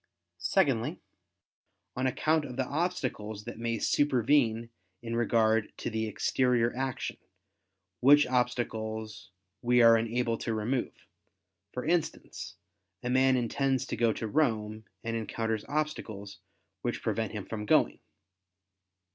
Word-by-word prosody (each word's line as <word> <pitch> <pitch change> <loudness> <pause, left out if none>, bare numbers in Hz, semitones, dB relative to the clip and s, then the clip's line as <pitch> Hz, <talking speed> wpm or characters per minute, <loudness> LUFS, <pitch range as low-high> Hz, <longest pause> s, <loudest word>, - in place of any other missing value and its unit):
Secondly, 135 - +1 1.0
on 130 +1 0
account 155 +4 +1
of 130 -3 -7
the 130 0 0
obstacles 130 - -2
that 110 - -8
may 115 0 -1
supervene 120 -3 +2 0.3
in 115 0 -3
regard 110 -2 +2
to - - -4
the 110 0 -1
exterior 120 +2 +1
action, 130 0 -3 0.8
which 145 +3 +7
obstacles 110 -4 -2 0.3
we 125 0 +3
are 115 0 +8
unable 115 +1 0
to 115 - -2
remove: 120 +4 -2 0.7
for 125 - -5
instance, 155 - -2 0.5
a 125 - -1
man 130 0 +4
intends 130 +2 0
to - - -3
go 115 0 +3
to 110 - -4
Rome, 110 -5 0 0.2
and 115 0 -2
encounters 110 0 -2
obstacles, 110 -10 -3 0.4
which - - -3
prevent 115 -1 -1
him 105 -3 -5
from 105 -2 -5
going. - - +3
115 Hz, 120 wpm, -30 LUFS, 110-130 Hz, 1.0 s, are